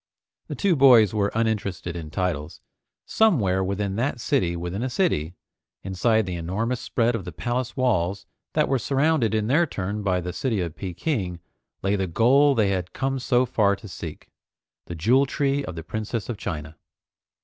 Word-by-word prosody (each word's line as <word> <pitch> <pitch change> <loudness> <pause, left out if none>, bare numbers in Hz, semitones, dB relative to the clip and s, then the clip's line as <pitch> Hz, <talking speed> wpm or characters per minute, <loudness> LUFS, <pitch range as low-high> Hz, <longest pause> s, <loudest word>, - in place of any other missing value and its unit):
The - - -5
two 195 -4 +2
boys 125 - +6
were 100 -2 +1
uninterested 100 -7 -1
in 80 -3 -6
titles. 80 -3 -3 0.5
Somewhere 105 - +2
within 100 +1 -2
that 125 +1 -1
city 85 -6 0
within 90 +4 -4
a 130 - -1
city, 105 - 0 0.5
inside 110 +3 +1
the 90 -2 -4
enormous 110 +9 -2
spread 120 0 +1
of 115 -5 -3
the 90 - -7
palace 120 - -3
walls 100 -6 0 0.3
that 150 -1 +2
were 135 -1 +1
surrounded 135 -2 +1
in 110 -1 +1
their 150 +9 +3
turn 100 -2 -4
by 95 -3 +1
the 90 0 -5
city 120 -6 -1
of 85 -3 -3
Peking, 95 - -3 0.4
lay 100 +1 +2
the 95 -1 -1
goal 135 - +4
they 105 -4 +2
had 90 -2 -2
come 135 0 -1
so 125 0 +2
far 105 -5 +2
to 105 - -12
seek, 85 -4 -9 0.6
the 85 - -5
Jewel 125 - +3
Tree 140 +1 0
of 90 - -6
the 80 - -6
Princess 110 +5 -4
of 120 - -3
China. 80 -5 -5
105 Hz, 175 wpm, -24 LUFS, 90-125 Hz, 0.6 s, boys